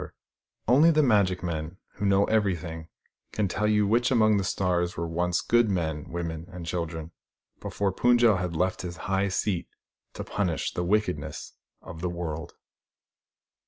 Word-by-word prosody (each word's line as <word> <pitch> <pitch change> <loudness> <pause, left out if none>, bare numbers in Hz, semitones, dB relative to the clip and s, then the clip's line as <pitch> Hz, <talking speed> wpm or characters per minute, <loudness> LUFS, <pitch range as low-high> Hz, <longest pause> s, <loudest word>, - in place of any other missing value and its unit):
io6 - - -3
THE - - -8
STORY - - -24
OF - - -64
THE - - -66
STARS 120 - +3
Only 160 +5 +6
the 155 -1 +3
magic 100 -5 +2
men, 85 +1 -4 0.2
who 100 - -2
know 100 0 +4
everything, 85 -7 -1 0.5
can 105 -2 0
tell 105 +3 -1
you 105 -1 +3
which 120 +4 +2
among 110 -5 +4
the 100 - 0
stars 90 -2 0
were 85 0 -2
once 90 +1 0
good 120 -2 +3
men, 80 -5 -2
women 85 -1 -4
and 90 -1 -8
children, 80 -1 -4 0.5
before 100 -1 -2
Fund 120 +5 +3
j - - +6
el 90 -4 +1
left 90 +3 -1
his 90 -1 -6
high 95 +1 +1
seat 95 -1 -1 0.5
to - - -5
punish 90 -6 -2
the 90 - -2
wickedness 100 0 -1 0.3
of 80 - -9
the 90 - -1
world. 85 -2 -5
90 Hz, 185 wpm, -27 LUFS, 85-105 Hz, 0.5 s, Only